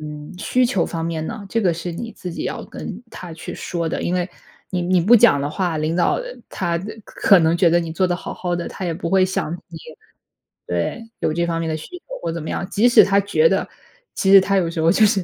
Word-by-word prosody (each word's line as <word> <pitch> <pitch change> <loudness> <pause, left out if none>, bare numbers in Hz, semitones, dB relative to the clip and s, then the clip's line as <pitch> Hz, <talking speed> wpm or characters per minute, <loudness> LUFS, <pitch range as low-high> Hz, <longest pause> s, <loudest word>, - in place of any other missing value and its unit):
嗯， 150 +1 -8
需 255 +5 +1
求 195 -8 0
方 165 -1 -4
面 160 -1 -3
呢， 220 -3 -6
这 230 - 0
个 180 -5 +2
是 170 +1 -5
你 230 +7 -6
自 180 - -7
己 - - -5
要 - - -4
跟 - - -8
他 175 -3 -9
去 160 - -8
说 170 -2 -3
的， - - -3
因 175 - -1
为 180 0 -1 0.4
你 180 -2 -1
你 180 0 +2
不 220 +8 +6
讲 210 -11 +5
的 145 - -2
话， 175 -1 -1
领 155 +3 -1
导， 175 - +3
呃， - - -3 0.2
他， 175 -3 -3
呃， 175 - -5 0.2
可 195 - +4
能 165 +1 +3
觉 175 -1 +4
得 175 +1 +4
你 165 -1 -5
做 185 +2 +1
得 175 - 0
好 - - -7
好 175 -1 -2
的， 170 - -4
他 190 - -7
也 170 -2 -1
不 170 0 -4
会 190 -1 +4
想 180 -3 -2 0.2
你 165 -1 -9 0.9
对， 90 - -2
有 - - 0
这 170 +1 0
方 165 -1 -1
面 165 - -2
的 155 - -1
需 260 - -10
求， - - -58 0.2
或 165 - -2
怎 165 -1 -5
么 - - -6
样。 185 - -3
即 230 +4 +4
使 235 -2 +8
他 200 0 +3
觉 460 - +3
得， - - 0 0.5
其 195 - +2
实 195 - +10
他 195 +1 +1
有 175 -3 +2
时 165 - -5
候 165 +1 +4
就 215 +2 +5
是 200 -3 +2
175 Hz, 285 characters per minute, -21 LUFS, 165-195 Hz, 0.9 s, 实